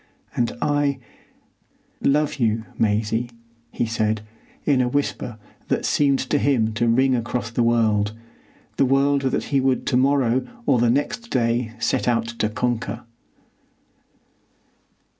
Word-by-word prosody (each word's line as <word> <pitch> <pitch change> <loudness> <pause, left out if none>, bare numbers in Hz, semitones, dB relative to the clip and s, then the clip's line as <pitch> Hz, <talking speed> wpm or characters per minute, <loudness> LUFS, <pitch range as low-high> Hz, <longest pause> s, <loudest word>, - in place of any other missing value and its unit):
"And 120 -1 0
I—love 145 +1 -3
you, 110 -3 +1 0.2
Maisie," 110 +2 +1 0.4
he - - -1
said, 110 -1 -1 0.4
in 140 -4 +3
a 125 - +1
whisper 125 -4 -2 0.3
that - - 0
seemed 140 -2 +3
to 145 - +3
him 115 -7 +1
to 120 +2 0
ring 130 +3 +3
across 120 0 -3
the 120 - 0
world,—the 110 -3 +2 0.7
world 140 +1 +3
that 135 -1 0
he 140 -2 +1
would 130 -1 +1
to 125 - +1
morrow 130 -2 +2 0.2
or 130 -4 +3
the 120 0 +3
next 145 - -1
day 115 -2 0
set 115 +1 0
out 115 -2 +2
to 105 - +1
conquer. 120 +1 -2
120 Hz, 125 wpm, -22 LUFS, 115-135 Hz, 0.7 s, in